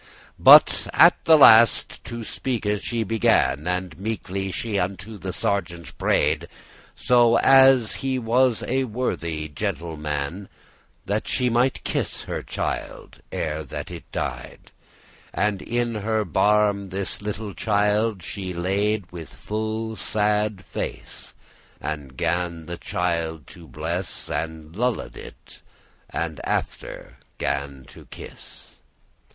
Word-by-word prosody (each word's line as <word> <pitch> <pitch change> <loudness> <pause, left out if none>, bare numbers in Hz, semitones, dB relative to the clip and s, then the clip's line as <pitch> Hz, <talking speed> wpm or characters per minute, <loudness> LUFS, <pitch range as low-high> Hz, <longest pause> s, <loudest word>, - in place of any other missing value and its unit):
But - - +7
at - - +5
the 160 -1 +7
last 115 -5 +6
to 120 -1 -6
speake 120 0 -3 0.2
she 115 -1 -2
began, 85 -9 +2
And 90 -2 -2
meekly 100 -2 -3
she 105 +1 -2
unto 100 +3 -4
the 95 +2 -4
sergeant 85 -7 -3
pray'd, 75 +3 +1 0.5
So 120 -2 +4
as 135 -3 +6
he 135 -1 -2
was 125 0 +2
a 130 +1 0
worthy 85 -10 -3
gentle 80 +2 -4
man, 75 +5 -4 0.6
That 105 +2 -2
she 125 -2 0
might 125 +3 +1
kiss - - -2
her - - -4
child, - - -5
ere 80 0 -3
that 70 - -7
it - - -10
died: - - -5 0.6
And 105 -2 0
in 120 0 -1
her 110 0 -1
barme* 100 +2 +2
this 95 +2 -3
little 105 0 -5
child 105 -1 +1
she 95 0 -5
laid, 100 +5 0
*lap, 85 - -27
bosom 90 - -8
With 80 - -10
full 110 +1 -4
sad 105 -2 0
face, - - -6 0.4
and 70 -4 -6
gan 85 0 -1
the 85 +2 -6
child 85 -4 -2
to 85 -2 -13
bless,* 85 +4 -4
*cross - - -3
And 80 0 -5
lulled 125 +1 -2
it, - - -13 0.5
and 80 -2 -4
after - - -4 0.2
gan 70 -1 -3
it - - -15
kiss. - - -12
100 Hz, 130 wpm, -23 LUFS, 85-110 Hz, 0.6 s, But